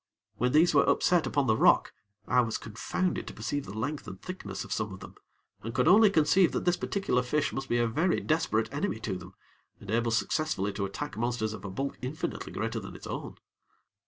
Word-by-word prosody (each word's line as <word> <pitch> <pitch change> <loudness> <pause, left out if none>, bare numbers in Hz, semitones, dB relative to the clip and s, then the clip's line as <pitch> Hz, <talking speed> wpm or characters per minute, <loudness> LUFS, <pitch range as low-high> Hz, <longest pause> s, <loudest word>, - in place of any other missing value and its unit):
When 125 +1 +1
these 160 +5 +5
were - - +4
upset 175 -2 +3
upon 145 -2 +1
the 110 - +3
rock, - - +4 0.3
I 125 - +4
was 115 -2 -1
confounded 115 - -2
to - - -8
perceive 135 +6 -3
the 100 +3 -7
length 145 +7 -3
and - - -8
thickness 185 0 -6
of - - -4
some 105 -2 -2
of 95 - -8
them; - - -11 0.5
and 115 +2 -6
could 125 +3 +2
only 210 +4 +7
conceive 175 +1 +4
that - - -2
this 175 0 +3
particular 195 -12 0
fish 145 +5 0
must 135 0 -4
be 120 - +2
a 120 - +3
very 160 +11 +1
desperate 135 -8 0
enemy 145 - -1
to 100 -4 -2
them, 90 +1 -10 0.4
and 100 - -8
able 115 +1 +1
successfully 105 -1 0
to 100 0 -2
attack 105 +5 -5
monsters 115 -2 -1
of 105 - -9
a 100 - -5
bulk 135 +9 -4
infinitely 155 +7 -4
greater 115 +2 -2
than 95 - -9
its - - -10
own. - - -5
125 Hz, 215 wpm, -29 LUFS, 110-155 Hz, 0.5 s, only